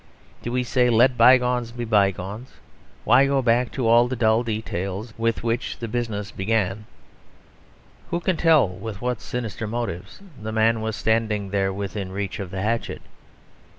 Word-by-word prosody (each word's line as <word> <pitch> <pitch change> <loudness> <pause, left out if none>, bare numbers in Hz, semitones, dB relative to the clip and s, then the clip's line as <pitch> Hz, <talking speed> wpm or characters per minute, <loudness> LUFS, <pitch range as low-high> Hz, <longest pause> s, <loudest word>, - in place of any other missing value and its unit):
Do 120 - -4
we 125 0 0
say 125 0 +2
"Let 120 +2 +4
byegones 125 -2 +4
be 120 0 -5
byegones; 100 +2 0 0.5
why 135 +2 +5
go 135 -1 +1
back 120 +1 +2
to 130 -4 -1
all 120 +1 +5
the 130 - -3
dull 110 -1 +3
details 110 -2 -4
with 115 -1 -1
which 115 +1 -2
the 115 - -5
business 110 -3 -3
began; 105 0 -1 1.2
who 170 - -1
can 185 +1 0
tell 160 - +4
with 95 +3 -7
what 125 -4 -2
sinister 115 0 -4
motives 115 -6 -5 0.2
the 110 +1 -4
man 110 0 +2
was 110 -1 -2
standing 110 -3 0
there 95 -1 +1
within 100 0 -5
reach 100 0 -4
of 95 -3 -5
the 95 0 -4
hatchet?" 115 +2 -2
115 Hz, 160 wpm, -23 LUFS, 100-120 Hz, 1.2 s, why